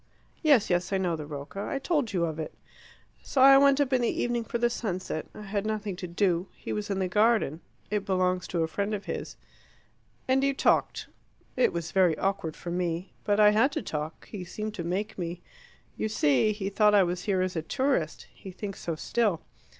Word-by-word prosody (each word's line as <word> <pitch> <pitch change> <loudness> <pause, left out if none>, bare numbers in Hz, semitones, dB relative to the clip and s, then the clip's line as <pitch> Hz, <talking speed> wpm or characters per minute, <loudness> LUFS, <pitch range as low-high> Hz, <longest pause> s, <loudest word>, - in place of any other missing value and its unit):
"Yes, 275 - +4
yes. 175 +2 +1
I 195 - +2
know 180 -3 0
the 155 -2 -7
Rocca; 145 +6 -6
I 275 - -2
told 280 - 0
you 175 -3 +1
of 160 -1 -4
it." 155 - -5 0.7
"So 275 - -2
I 270 +1 +9
went 280 0 +5
up 280 -2 +1
in 255 - +3
the 235 - +2
evening 240 -1 -1
for 235 - -3
the 240 0 +3
sunset: 185 -9 -3
I 210 - -8
had 200 0 -2
nothing 215 -2 -3
to 180 - -5
do. 175 0 +1
He - - -5
was 210 -1 -3
in 195 - -1
the 190 -1 0
garden: 210 -5 +2 0.3
it 210 -1 0
belongs 185 -1 0
to 170 -2 0
a - - 0
friend 200 +5 -2
of 200 - -7
his." - - -5 0.9
"And 265 +1 +3
you 275 0 +2
talked." - - +1 0.5
"It 255 - +3
was 170 -1 -4
very 185 -4 +3
awkward 190 -5 -1
for 175 - -7
me. 175 0 -2
But 205 0 +2
I 210 0 +7
had 225 +7 +3
to - - -2
talk: 155 -2 -5
he 200 -4 -6
seemed 215 +4 -5
to 180 - -5
make 190 +5 -3
me. 175 0 -4 0.5
You 220 - -2
see 150 - +3
he 200 -2 -3
thought 210 +1 +4
I 200 - +6
was 175 0 -3
here 190 -3 +1
as 185 0 -3
a 160 - 0
tourist; 260 - -1
he 195 - -11
thinks 195 +1 -6
so 165 - -3
still. 205 0 0
195 Hz, 215 wpm, -28 LUFS, 175-220 Hz, 0.9 s, I